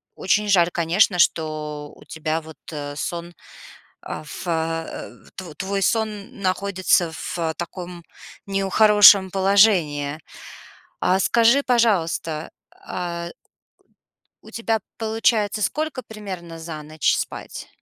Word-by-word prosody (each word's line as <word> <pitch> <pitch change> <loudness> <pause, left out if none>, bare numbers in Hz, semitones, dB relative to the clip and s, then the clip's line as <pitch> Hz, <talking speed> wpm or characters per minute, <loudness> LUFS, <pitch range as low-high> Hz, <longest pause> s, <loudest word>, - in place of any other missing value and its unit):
очень 205 +2 +1
жаль, 175 -3 +4
конечно, 180 +3 +2
что 150 -3 0
у - - -17
тебя 160 0 -2
вот, 160 0 -13
э, 145 -1 -6
сон, 170 +2 -5 0.7
э, - - -5
в 150 +4 -8
э 165 -1 -3 0.2
тво 180 -5 -8
твой 195 +2 -2
сон 220 +1 -1
находится 185 -2 +1
в 175 - -6 0.2
таком 175 0 -7 0.4
нехорошем 200 0 +6
положении. 185 -7 +3 0.8
А 185 +1 +2
скажи, 235 +7 +4
пожалуйста, 175 - 0 0.2
а 170 -1 -5 1.1
у - - -15
тебя, 230 -1 -1 0.2
получается, 220 -1 +1
сколько 300 +3 -2
примерно 190 -7 -8
за 160 -2 -7
ночь 155 0 0
спать? - - -6
185 Hz, 110 wpm, -22 LUFS, 160-210 Hz, 1.1 s, нехорошем